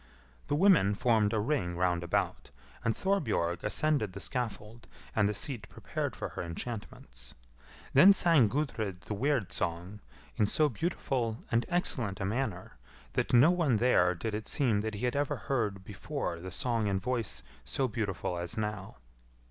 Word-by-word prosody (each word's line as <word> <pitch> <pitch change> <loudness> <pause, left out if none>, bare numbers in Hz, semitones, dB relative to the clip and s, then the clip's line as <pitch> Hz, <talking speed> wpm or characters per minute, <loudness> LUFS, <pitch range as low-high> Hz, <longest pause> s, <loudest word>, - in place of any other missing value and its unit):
The - - +1
women 160 - +5
formed 110 -2 +2
a 110 - +1
ring 105 -7 -1
round 90 -1 +1
about, 85 - -1 0.3
and 115 - +1
Thorbjorg 140 - 0
ascended 110 -3 +1
the 100 - -7
scaffold 115 -1 -4 0.3
and 105 -1 +3
the - - -1
seat 110 -3 -3
prepared - - -4
for - - -4
her - - -6
enchantments. 85 - -7 0.6
Then 180 +9 +9
sang 165 - +5
Gudrid 110 -9 -2
the 90 - -5
weird 120 -4 0
song 90 +4 -3 0.4
in 105 - +3
so 150 +7 +3
beautiful 125 - -2
and 115 +1 +1
excellent 125 - 0
a 95 - -2
manner, 105 -4 -3 0.4
that - - 0
to - - +3
no 145 +8 +7
one 165 -9 +2
there 95 -6 +3
did 110 +6 -4
it 105 0 -4
seem 120 -8 +2
that 110 0 -3
he 110 +5 -2
had 125 - 0
ever 145 0 0 0.5
before 85 - -4
heard 85 - -9
the 95 - -6
song 115 +2 0
in 100 -1 0
voice 120 -3 -2 0.2
so 135 - 0
beautiful 100 -6 -3
as 85 +6 -4
now. 105 -5 -4
110 Hz, 165 wpm, -31 LUFS, 95-130 Hz, 0.6 s, Then